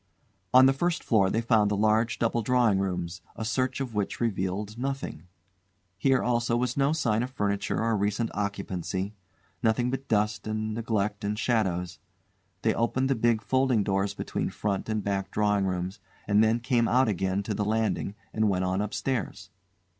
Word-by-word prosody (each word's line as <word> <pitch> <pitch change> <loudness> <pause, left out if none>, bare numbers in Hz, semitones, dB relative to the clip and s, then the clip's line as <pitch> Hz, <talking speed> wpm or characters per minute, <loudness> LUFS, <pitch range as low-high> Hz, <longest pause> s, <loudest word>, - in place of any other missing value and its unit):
On 130 +1 +8
the 135 - +5
first 175 +5 -1
floor 100 -5 +3
they 115 - 0
found 110 -3 +3
the 105 - 0
large 110 +3 +2
double 115 0 +1
drawing 115 -4 +3
rooms, 90 -2 -3
a 110 - -4
search 130 +4 0
of 130 -4 -4
which 105 -2 -2
revealed 100 -1 -2
nothing. 130 - -4 0.7
Here 135 +2 +3
also 120 -1 +1
was 125 +1 -1
no 140 +1 +2
sign 115 -9 +1
of 125 - -2
furniture 100 -5 -1
or 115 0 +1
recent 105 +3 0
occupancy; 100 -1 -3 0.5
nothing 120 +2 +2
but 135 +1 -4
dust 105 0 0
and 110 0 -2
neglect 105 -2 -1
and 105 +1 -1
shadows. 95 -8 0 0.6
They - - +3
opened 130 +3 0
the - - +3
big 115 -1 +1
folding 130 0 +2
doors 95 0 0
between - - -3
front 100 0 -3
and 110 -2 -1
back 100 -1 -2
drawing 105 -2 +1
rooms 90 +1 -3 0.3
and 105 +1 +4
then 115 +2 +2
came 120 -2 +2
out 130 +1 +3
again 95 -1 0
to 105 - -3
the 105 - -1
landing 110 -1 -1 0.2
and 110 -1 +2
went 95 -1 0
on 95 +2 0
upstairs. 105 -2 -3
110 Hz, 175 wpm, -27 LUFS, 100-120 Hz, 0.7 s, On